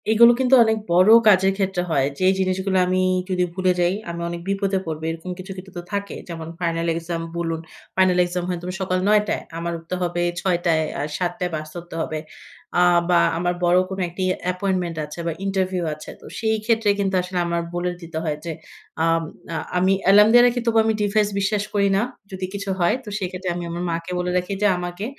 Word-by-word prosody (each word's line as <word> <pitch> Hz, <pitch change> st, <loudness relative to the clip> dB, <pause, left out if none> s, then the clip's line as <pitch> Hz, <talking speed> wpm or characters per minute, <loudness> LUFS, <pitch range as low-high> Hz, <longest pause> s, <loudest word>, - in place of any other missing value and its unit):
এগুলো 235 Hz, +2 st, +7 dB
কিন্তু 260 Hz, 0 st, +5 dB
অনেক 220 Hz, -1 st, +1 dB
বড় 180 Hz, +4 st, +5 dB, 0.2 s
কাজের 190 Hz, -2 st, +6 dB
ক্ষেত্রে 190 Hz, -2 st, 0 dB
হয়। 135 Hz, -4 st, +3 dB
যে 185 Hz, -, +1 dB
জিনিসগুলা 190 Hz, 0 st, +1 dB
আমি 185 Hz, 0 st, +1 dB, 0.3 s
যদি 180 Hz, -1 st, +1 dB
ভুলে 185 Hz, 0 st, +1 dB
যাই 175 Hz, +1 st, +3 dB, 0.2 s
আমি 170 Hz, 0 st, -5 dB
অনেক 170 Hz, 0 st, -5 dB
বিপদে 195 Hz, 0 st, 0 dB
পড়বো। 160 Hz, -1 st, -5 dB
এরকম 165 Hz, +2 st, -6 dB
কিছু, 185 Hz, +1 st, -8 dB
কিছু 190 Hz, +1 st, -10 dB
তো -, -, -3 dB
থাকে। 200 Hz, 0 st, -3 dB
যেমন 165 Hz, -2 st, -6 dB
final 165 Hz, -1 st, -1 dB
exam 165 Hz, 0 st, -3 dB, 0.2 s
বলুন। 165 Hz, -1 st, -2 dB, 0.4 s
Final 185 Hz, -1 st, +3 dB
exam 175 Hz, 0 st, -3 dB
হয় 180 Hz, -, -1 dB, 0.2 s
সকাল 185 Hz, -1 st, 0 dB
৯ 210 Hz, 0 st, +5 dB
টায়। -, -, -1 dB, 0.2 s
আমার 170 Hz, 0 st, -3 dB
উঠতে 165 Hz, +2 st, -5 dB
হবে 175 Hz, -1 st, -1 dB, 0.2 s
৬ 180 Hz, -2 st, +1 dB
টায়। 160 Hz, -2 st, +3 dB, 0.2 s
আ -, -, -1 dB, 0.2 s
৭ 180 Hz, -1 st, 0 dB
টায় 180 Hz, -1 st, -1 dB
বাস 155 Hz, 0 st, -5 dB
ধরতে 175 Hz, -1 st, -8 dB
হবে। 155 Hz, -1 st, -3 dB, 0.6 s
অ্যা 180 Hz, -, +5 dB, 0.2 s
বা 175 Hz, -, +5 dB, 0.2 s
আমার 175 Hz, +1 st, 0 dB
বড় 175 Hz, +1 st, +4 dB
কোন 190 Hz, 0 st, -5 dB
একটি 180 Hz, +2 st, -4 dB, 0.3 s
appointment 180 Hz, -2 st, -1 dB
আছে 150 Hz, +3 st, -10 dB
বা -, -, +1 dB
interview 190 Hz, -2 st, 0 dB
আছে। 155 Hz, 0 st, -10 dB
তো -, -, -16 dB
সেইক্ষেত্রে 220 Hz, -1 st, +1 dB
কিন্তু 195 Hz, -1 st, 0 dB
আসলে 180 Hz, 0 st, -5 dB
আমার 170 Hz, 0 st, 0 dB
বলে 175 Hz, +1 st, -1 dB
দিতে 165 Hz, -1 st, -7 dB
হয় 150 Hz, -2 st, -1 dB
যে 170 Hz, -, -3 dB, 0.5 s
আম 165 Hz, 0 st, +3 dB, 0.3 s
আ -, -, -3 dB, 0.2 s
আমি 185 Hz, +2 st, +3 dB
অ্যালার্ম 205 Hz, +2 st, +7 dB
দিয়ে 240 Hz, 0 st, +8 dB
রাখি 245 Hz, 0 st, 0 dB
তবু 230 Hz, -1 st, +2 dB
আমি 220 Hz, -, +2 dB
device 210 Hz, 0 st, +2 dB
বিশ্বাস 200 Hz, +1 st, 0 dB
করি 200 Hz, -1 st, +3 dB
না। -, -, +2 dB, 0.3 s
যদি 190 Hz, -1 st, -4 dB
কিছু 200 Hz, 0 st, -5 dB
হয়। 175 Hz, +5 st, +3 dB
তো 215 Hz, -, -8 dB
সেইক্ষেত্রে 185 Hz, 0 st, -4 dB
আমি 175 Hz, -, -4 dB
আমার 170 Hz, +1 st, -4 dB
মাকে 165 Hz, +2 st, -4 dB
বলে 180 Hz, 0 st, -1 dB
রাখি 180 Hz, +2 st, -2 dB
যে 210 Hz, -, +5 dB
আমাকে 175 Hz, +3 st, -5 dB
180 Hz, 205 wpm, -22 LUFS, 170-195 Hz, 0.6 s, দিয়ে